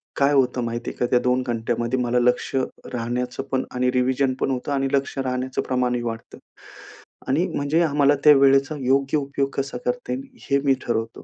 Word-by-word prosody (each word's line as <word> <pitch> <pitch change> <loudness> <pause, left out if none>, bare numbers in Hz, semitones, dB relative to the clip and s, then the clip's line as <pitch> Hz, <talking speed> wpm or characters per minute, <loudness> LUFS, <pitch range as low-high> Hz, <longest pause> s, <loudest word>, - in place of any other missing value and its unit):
काय 140 +1 +3
होतं 125 -2 +2
माहिती 120 +1 -3
आहे - - -10
का? 125 - +1
त्या 125 - +5
2 125 +1 +1
घंट्यामध्ये 120 +1 -1
मला 125 0 +1
लक्ष 125 +2 +1 0.4
राहण्याचं 125 +2 -3
पण 130 -1 +1
आणि 125 0 +1
रिव्हिजन 130 +1 +1
पण 135 - 0
होतं 130 +2 -3
आणि 135 -1 +1
लक्ष 140 0 -1
राहण्याचं 130 0 -2
प्रमाणही 125 -1 0
वाढतं. 115 -1 -6 0.9
आणि - - +1
म्हणजे 145 +4 +1
आम्हाला 145 -2 +3
त्या 150 - +10
वेळेचा 135 +2 +4
योग्य 135 +3 +2
उपयोग 140 -1 -2
कसा 135 0 -3
करते 245 0 -2 0.4
हे 140 - +3
मी 135 - +5
ठरवतो. 115 -1 -3
130 Hz, 175 wpm, -23 LUFS, 125-140 Hz, 0.9 s, त्या